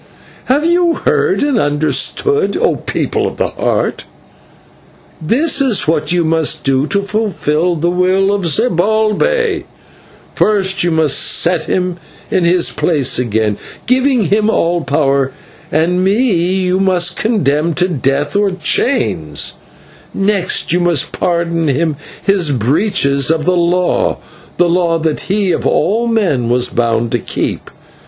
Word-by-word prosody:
Have 285 +5 +1
you 345 0 +2
heard 380 -9 0
and 285 -5 +1
understood, 155 - 0
O - - +1
people - - -2
of - - -7
the - - 0
Heart? - - -2 1.2
This 275 - +1
is 250 - +1
what 155 -1 0
you 175 -1 +1
must 160 -1 0
do 135 +1 +1
to 200 +3 -1
fulfil 180 -5 -1
the 170 +2 0
will 185 +2 +1
of 195 -4 -1
Zibalbay: 220 - +1 0.7
First, 195 -3 +1
you 175 - +1
must 160 -2 +2
set 170 -2 +2
him 180 -1 -2 0.3
in 180 - +1
his 175 0 +2
place 145 -8 +1
again, 110 -3 -1 0.3
giving 255 -2 +2
him 210 +1 +2
all 175 -4 +1
power, 135 -1 0 0.4
and 175 +4 +1
me 215 +5 +2
you 180 +2 0
must 180 -2 +1
condemn 165 - 0
to 180 0 +2
death 145 -2 -1
or 205 0 +2
chains; 80 - 0 0.6
next, 195 -4 0
you 175 - +2
must 175 -5 0
pardon 170 -2 -1
him 150 +3 0 0.3
his 195 -5 +1
breaches 140 - +1
of 160 -1 0
the 180 - +3
law 175 +1 +1 0.4
the 175 - +3
law 170 -1 +1
that 160 -1 -1
he 200 -1 +1
of - - -1
all 225 +5 +1
men 180 - 0
was 125 0 +1
bound 115 -1 -1
to 120 - 0
keep. - - -4
175 Hz, 140 wpm, -14 LUFS, 150-205 Hz, 1.2 s, the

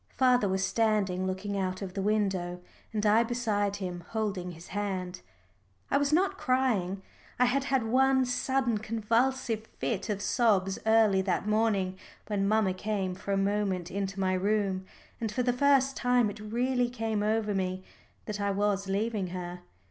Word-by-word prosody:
Father 250 -5 +4
was 190 0 +1
standing 205 -5 +1
looking 190 +2 -3
out 185 0 -2
of 185 -2 -6
the 195 - -2
window, 190 -4 0 0.3
and 215 -1 -1
I 215 +2 +5
beside 215 -4 -1
him 180 -3 -5
holding 200 -5 -2
his 165 +1 -12
hand. 190 - -3 0.7
I - - +4
was 285 0 +1
not 380 +4 +2
crying. 210 -8 0 0.3
I 250 - +4
had 270 +3 +1
had 265 -3 +1
one 260 +3 +3
sudden 250 -2 0
convulsive 225 +1 0
fit 215 -4 -2
of 205 -2 -1
sobs 200 -6 +2
early 220 -3 +5
that 190 +1 -1
morning 205 -4 +1 0.3
when 200 -2 0
mamma 215 -3 +2
came 190 -1 -2
for 200 +2 -6
a 195 - +2
moment 195 -3 0
into 195 0 -3
my 185 -1 +1
room, 190 -1 0 0.3
and 225 -2 -2
for 250 +4 -1
the 245 0 +2
first 275 +1 +3
time 245 -4 +2
it 205 - -11
really 245 +3 0
came 225 -3 -2
over 215 0 +1
me 185 -1 -2 0.4
that 210 -1 -4
I 200 - +1
was 200 0 0
leaving 205 0 -1
her. 180 0 -6
210 Hz, 165 wpm, -29 LUFS, 190-235 Hz, 0.7 s, I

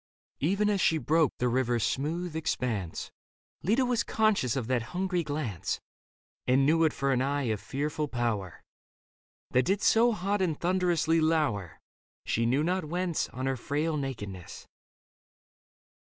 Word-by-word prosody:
Even 195 +8 +1
as 205 -2 +1
she 160 - +3
broke 155 -1 +2
the 125 - +1
river's 120 -2 +1
smooth 160 +4 -2
expanse, 115 - -2 0.5
Leda 230 +8 +2
was 245 -2 +1
conscious 215 - +1
of 130 -4 -1
that 125 0 +1 0.2
hungry 185 -1 0
glance. 145 - -3 0.7
And 130 +2 +4
knew 165 +3 +4
it 155 - +3
for 140 0 -1
an 130 -1 +2
eye 140 +1 0
of 105 - -4
fearful 150 +6 -2
power 115 - -2 0.9
That 125 0 +3
did 195 +2 +1
so 235 +2 +5
hot 200 0 -1
and 165 -5 0
thunderously 175 -3 +2
lour, 150 - 0 0.5
She 115 +1 +1
knew 135 +5 +2
not 180 +1 0
whence, 175 +1 -1
on 130 +1 -5
her 135 0 0
frail 150 +5 -1
nakedness. 105 - -6
150 Hz, 145 wpm, -29 LUFS, 125-175 Hz, 0.9 s, so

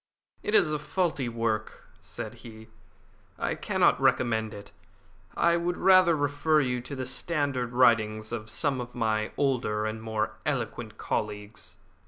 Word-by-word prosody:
"It 210 - 0
is 155 - +5
a 150 - -1
faulty 155 -5 -1
work," 115 -2 -2
said 110 - -7
he; 110 -2 -12 0.7
"I - - -1
cannot - - +2
recommend 110 -3 +2
it. 100 0 -10 0.7
I 170 0 +4
would 175 +1 -1
rather 185 -3 +6
refer 145 +2 +2
you 125 -3 0
to 140 +3 -7
the 130 -1 -4
standard 135 -2 -1
writings 110 -3 +3
of 110 -2 -5
some 135 -2 0
of 125 0 -9
my 110 -2 0
older 120 -6 0
and 110 0 -4
more 110 -1 -2
eloquent - - -3
colleagues." 105 0 -4
120 Hz, 145 wpm, -28 LUFS, 110-145 Hz, 0.7 s, rather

